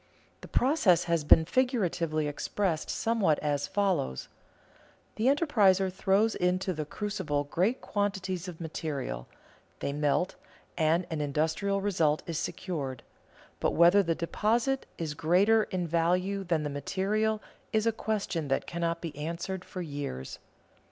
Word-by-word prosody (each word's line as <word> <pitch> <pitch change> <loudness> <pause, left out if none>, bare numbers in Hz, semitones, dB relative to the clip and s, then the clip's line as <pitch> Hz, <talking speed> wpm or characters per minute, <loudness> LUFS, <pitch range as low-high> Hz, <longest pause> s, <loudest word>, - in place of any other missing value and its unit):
The - - -9
process 240 - +3
has 170 -2 0
been 160 +2 +6
figuratively 175 - 0
expressed 160 +3 -2
somewhat 225 -9 +1
as 145 -1 -1
follows: 190 - -1 0.9
the 220 - -1
enterpriser 205 - +3
throws 200 +4 +2
into 185 +1 0
the 155 -2 -4
crucible 185 -5 -2
great 185 - 0
quantities 190 -3 -2
of 175 -3 -8
material; 145 - -4 0.5
they 140 - -3
melt, 150 +5 +1 0.4
and 165 +2 +2
an 155 -2 -2
industrial 160 +7 0
result 165 -7 +1
is 165 -2 -3
secured, 155 -8 -4 0.6
but - - 0
whether 175 +4 +6
the 165 -3 0
deposit 230 +10 0
is 160 -3 -3
greater 195 +8 +3
in 180 -2 -2
value 180 +4 +1
than 170 -4 0
the 145 - -3
material 205 +9 0 0.3
is 220 0 +1
a 230 - +4
question 205 -8 -2
that 135 - 0
cannot 170 -1 -2
be 165 -4 -6
answered 170 +5 -4
for 185 -1 -6
years. 140 - -5
175 Hz, 135 wpm, -29 LUFS, 155-200 Hz, 0.9 s, been